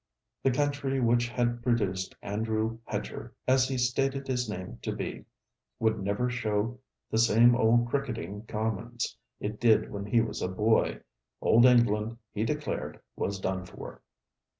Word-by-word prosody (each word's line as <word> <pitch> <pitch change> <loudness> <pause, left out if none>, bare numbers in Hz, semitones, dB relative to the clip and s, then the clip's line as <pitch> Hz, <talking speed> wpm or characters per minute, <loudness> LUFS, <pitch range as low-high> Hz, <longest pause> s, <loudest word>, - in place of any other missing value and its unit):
The 135 - +3
country 140 0 0
which 120 -1 +3
had 120 0 0
produced 100 -6 0
Andrew 110 +2 -1
Hedger, - - -5
as 130 0 +4
he 130 - -2
stated 135 +2 0
his 125 -3 -1
name 90 -3 -6
to - - -2
be, - - -5 0.5
would 110 -1 +1
never 100 +5 0
show 115 -1 -1 0.3
the 110 - +2
same 115 +1 +6
old 120 0 +4
cricketing 115 -6 -3
commons 110 +2 -3 0.2
it 105 +1 -4
did 115 -3 +4
when 100 0 -5
he 115 +3 +3
was 115 - -1
a - - 0
boy. 105 +4 +2 0.4
Old 120 +2 +5
England, 115 -2 +3 0.2
he 105 - -1
declared, 115 - -3 0.2
was 100 -1 -2
done 95 -1 -2
for. 90 - -10
115 Hz, 150 wpm, -29 LUFS, 105-125 Hz, 0.5 s, same